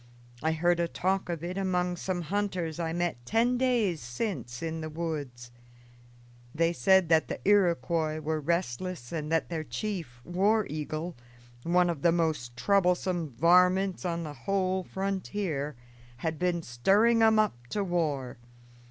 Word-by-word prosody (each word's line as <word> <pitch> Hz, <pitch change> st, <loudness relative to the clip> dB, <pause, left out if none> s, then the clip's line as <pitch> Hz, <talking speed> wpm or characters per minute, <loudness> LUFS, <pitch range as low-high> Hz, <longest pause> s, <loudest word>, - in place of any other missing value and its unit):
I 160 Hz, +1 st, +1 dB
heard 175 Hz, +2 st, +2 dB
a 170 Hz, -, +1 dB
talk 190 Hz, +2 st, -1 dB
of 170 Hz, -2 st, -3 dB
it 180 Hz, +3 st, -3 dB
among 180 Hz, -2 st, 0 dB
some 175 Hz, 0 st, -3 dB
hunters 180 Hz, -3 st, -2 dB
I 165 Hz, -1 st, -1 dB
met 170 Hz, -7 st, -2 dB
ten 230 Hz, -, +2 dB
days 230 Hz, -, +1 dB
since 120 Hz, -, -4 dB
in 160 Hz, 0 st, -3 dB
the 155 Hz, -, -4 dB
woods. 145 Hz, -7 st, -5 dB, 1.0 s
They 165 Hz, +2 st, +2 dB
said 190 Hz, +5 st, +4 dB
that 160 Hz, -1 st, +4 dB
the -, -, -4 dB
Iroquois 170 Hz, -5 st, +2 dB
were 155 Hz, 0 st, -2 dB
restless 170 Hz, -2 st, -2 dB
and 155 Hz, -2 st, -4 dB
that 165 Hz, -, +1 dB
their 165 Hz, -2 st, -3 dB
chief, 155 Hz, -, -5 dB
War 200 Hz, +5 st, +2 dB
Eagle, 155 Hz, +3 st, -4 dB, 0.5 s
one 175 Hz, +4 st, +3 dB
of 165 Hz, -5 st, -2 dB
the 170 Hz, -, +4 dB
most 155 Hz, -8 st, -1 dB
troublesome 180 Hz, +1 st, +1 dB
varmints 180 Hz, -, +4 dB
on 170 Hz, -2 st, -2 dB
the 150 Hz, -2 st, -6 dB
whole 185 Hz, +6 st, -1 dB
frontier, 190 Hz, -6 st, -3 dB, 0.4 s
had 160 Hz, +5 st, -3 dB
been 175 Hz, -2 st, 0 dB
stirring 200 Hz, -, +3 dB
'em 220 Hz, -1 st, +5 dB
up 120 Hz, -, 0 dB
to 205 Hz, +9 st, -1 dB
war. 145 Hz, -9 st, -1 dB
170 Hz, 150 wpm, -29 LUFS, 155-190 Hz, 1.0 s, em